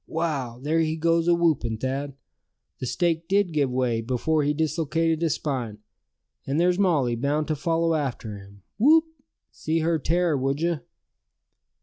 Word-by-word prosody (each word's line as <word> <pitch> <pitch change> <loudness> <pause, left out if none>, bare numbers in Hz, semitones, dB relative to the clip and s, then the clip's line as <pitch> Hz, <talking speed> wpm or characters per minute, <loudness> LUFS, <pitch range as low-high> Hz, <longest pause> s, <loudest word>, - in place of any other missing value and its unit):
Wow! 145 -8 -2
there 155 +5 0
he 160 -1 +1
goes 165 +1 +1
awhoopin', 160 -10 +2
Thad! 135 +2 -3 0.6
The 130 - -4
stake 165 +2 0
did 200 -2 +2
give 145 -4 +1
way, 125 -3 0
before 130 +6 0
he 145 0 +1
dislocated 160 +1 0
his 165 -3 +1
spine. 125 -8 -3 0.7
And 140 +3 0
there's 180 +2 +2
Molly 150 -11 +2
bound 145 +5 -1
to 155 - +1
follow 165 +2 0
after 130 -8 -3
him, 100 0 -16 0.2
whoop! 315 +7 +6 0.5
see 160 +1 -2
her 165 0 +1
tear, 170 +2 +1
would 135 +1 -1
you?" 170 -1 0
155 Hz, 150 wpm, -25 LUFS, 130-165 Hz, 0.7 s, whoop